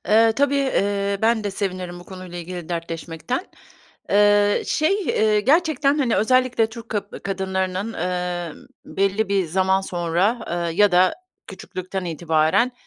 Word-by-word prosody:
Eee, 225 +1 +5
tabii, 285 +4 +1
eee, 200 -7 0
ben 225 -1 +2
de 205 - -1
sevinirim 185 -3 -4
bu - - -13
konuyla 185 -2 -9
ilgili 175 -1 -7
dertleşmekten. 170 - -4 0.6
Eee, 205 0 +4
şey, 390 +7 +1
eee, 215 -1 +2
gerçekten, 300 +2 +2
hani, 255 -6 +1
özellikle, 255 0 +2
Türk 230 0 -10
kab 210 -2 -2 0.2
kadınlarının, 190 +2 -2
emm, 180 -1 -4 0.2
belli 195 +2 0
bir 195 -2 +1
zaman 190 +3 +2
sonra, 180 +4 0
eee, 170 -1 -2
ya 205 -2 +4
da 185 - +4 0.3
küçüklükten 185 0 -6
itibaren 165 - +1
195 Hz, 135 wpm, -22 LUFS, 180-225 Hz, 0.6 s, Eee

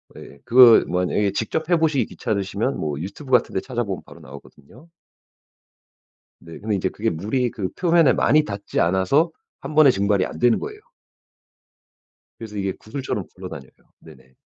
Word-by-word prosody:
예예. 70 - -13
그거 120 -1 +7
만약에 90 +3 0
직접 155 +10 -3
해보시기 160 -5 +2
귀찮으시면 105 +2 -3
뭐 75 -2 -3
유튜브 100 - -8
같은 125 - +3
데 - - +2
찾아보면 120 -7 -4
바로 85 - -15
나오거든요. 75 - -15 1.5
네. 85 -1 -11
근데 105 0 -2
이제 95 -1 -1
그게 110 +4 -2
물이 110 +9 -2
그 95 -4 -4
표면에 170 -4 +3
많이 155 +2 +3
닿지 100 -7 -5
않아서 95 - +2 0.3
1 - - -7
번에 155 -2 +7
증발이 100 -2 +1
안 - - -8
되는 120 -1 +3
거예요. 425 0 -7 1.6
그래서 105 -2 -8
이게 95 -1 -2
구슬처럼 110 -4 -5
굴러다녀요. 90 -8 -10 0.3
네네. 65 0 -18
105 Hz, 345 characters per minute, -22 LUFS, 95-130 Hz, 1.6 s, 그거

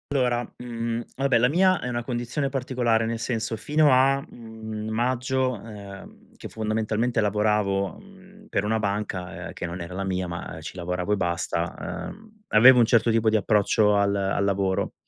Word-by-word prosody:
Allora, 125 -2 +1
mhmm, 115 -1 -3 0.2
vabbè, 135 -2 +3
la 125 +2 +3
mia 185 +4 +3
è 125 - -3
una 120 -1 -2
condizione 120 +3 -2
particolare. 125 -4 0
Nel 115 0 -2
senso, 115 -1 -2
fino 150 +5 +3
a, 135 +2 +4
mhmm, 110 -2 -8
maggio, 130 +3 0
ehm, 100 -3 -12
che - - -8
fondamentalmente 110 +2 -1
lavoravo, 105 -2 +1
mhmm, 200 +1 -17
per 95 - 0
una 110 +2 0
banca, 100 -3 -3
ehm, - - -9
che - - -5
non 85 +1 -5
era 85 +2 -7
la 95 +1 -3
mia, 95 -1 -2
ma 85 -2 -6
ci 80 - -8
lavoravo 90 +2 -3
e - - +1
basta, 85 -2 -3
ehm, 215 +2 -13 0.2
avevo 125 +4 +8
un 120 - +6
certo 115 0 +3
tipo 110 0 +3
di 110 - +1
approccio 105 0 +3
al 100 0 +2
al 100 0 0
lavoro. 95 -1 0
110 Hz, 175 wpm, -25 LUFS, 100-125 Hz, 0.2 s, avevo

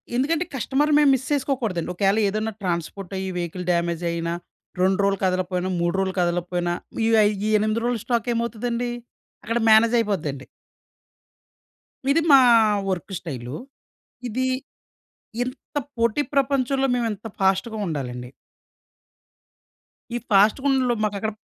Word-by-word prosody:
ఎందుకంటే 310 +7 +1
కస్టమర్‌ని 280 +5 +1
మేము 290 -2 +5
మిస్ 260 0 -5
చేసుకోకూడదండి. 250 - -1
ఒకేల 195 +3 +2
ఏదన్నా 215 +2 -2
ట్రాన్స్‌పోర్టయ్యి 190 +2 -3
వెహికల్ 175 +1 -4
డ్యామేజయినా 170 0 -1 0.5
2 190 +1 +2
రోజులు 200 -1 +1
కదలకపోయినా, 185 0 -1
3 170 0 +1
రోజులు 190 -1 -1
కదలకపోయినా 175 0 -1 0.3
ఈ - - +2
వ 220 - +6 0.3
ఈ - - +1
8 215 +2 0
రోజుల 240 -2 0
స్టాకేమవుతదండి 235 0 -1 0.5
అక్కడ 230 +1 -1
మేనేజయిపోద్దండి. 210 - +3 1.7
ఇది 325 +4 +3
మా 275 - +9 0.5
వర్కు 190 +1 -3
స్టైలు. 130 -5 -6 0.7
ఇది 255 +3 -1 1.0
ఇంత 255 +4 -9 0.2
పోటీ 230 +4 +2
ప్రపంచంలో 270 -1 +1
మేమెంత 225 -3 -2
ఫాస్ట్‌గా 195 +4 +1
ఉండాలండి. 125 -6 -4 1.9
ఈ - - +1
ఫాస్ట్‌గుండడంలో 250 +5 +3
మాకక్కడ 210 +1 -2
210 Hz, 105 wpm, -23 LUFS, 180-245 Hz, 1.9 s, మా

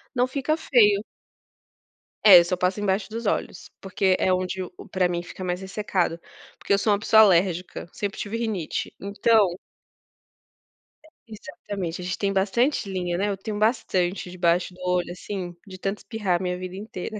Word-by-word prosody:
não 245 +1 +2
fica 280 +3 -1
feio. 210 -9 +4 1.2
É, 190 -4 +11
eu 170 - +2
só 180 - -1
passo 180 +3 0
embaixo 195 0 -1
dos 230 +1 -6
olhos, 200 - -2
porque 190 -1 +1
é 185 - +1
onde 185 +1 -2
o 180 - -9
o - - -11
para 185 -2 +1
mim 175 -1 -2
fica 185 - -9
mais 180 0 -2
ressecado. 190 -3 -2 0.4
Porque - - -7
eu 200 - +6
sou 205 +1 +2
uma 200 - 0
pessoa 220 0 +6
alérgica, 180 -2 +1
sempre 205 -1 -4
tive 215 +2 -4
rinite, 215 -8 -3
então. 200 -2 +2 1.5
É, - - -18 0.2
exatamente, 200 -5 -6
a - - -6
gente 185 - -3
tem 200 -1 0
bastante 210 +5 +1
linha, 180 -2 -2
né, 205 +2 0
eu 200 - -2
tenho 205 +2 -5
bastante 195 -5 0
debaixo 175 0 +1
do 180 - -18
olho 180 -1 0
assim, 180 -1 -6
de 185 - -9
tanto 195 +2 -3
espirrar 200 -6 -1
a - - -5
minha 180 0 -2
vida 185 0 -7
inteira. 210 +1 -6
195 Hz, 180 wpm, -24 LUFS, 180-210 Hz, 1.5 s, É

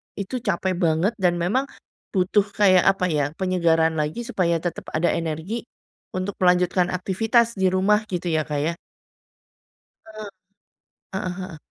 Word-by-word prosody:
itu 205 +6 -4
capek 190 -4 -1
banget 170 +4 +2
dan 175 -2 +2
memang 210 +11 0 0.5
butuh 195 +2 +3
kayak 185 -3 +5
apa 195 -2 +3
ya, 150 -2 +1
penyegaran 165 -4 +1
lagi 150 +11 -2
supaya 170 -6 0
tetep 175 - -4
ada 170 +2 +2
energi 165 +9 -3 0.4
untuk 185 +2 -3
melanjutkan 180 0 +3
aktivitas 225 +6 +1
di 190 -1 +2
rumah, 195 +3 +3
gitu 175 -2 -2
ya 155 - +2
Kak 150 -2 -3
ya? 170 - 0 1.3
Eee, 215 -1 -8 0.9
heeh 185 -1 -2
heeh. 185 -4 -7
185 Hz, 140 wpm, -23 LUFS, 170-200 Hz, 1.3 s, kayak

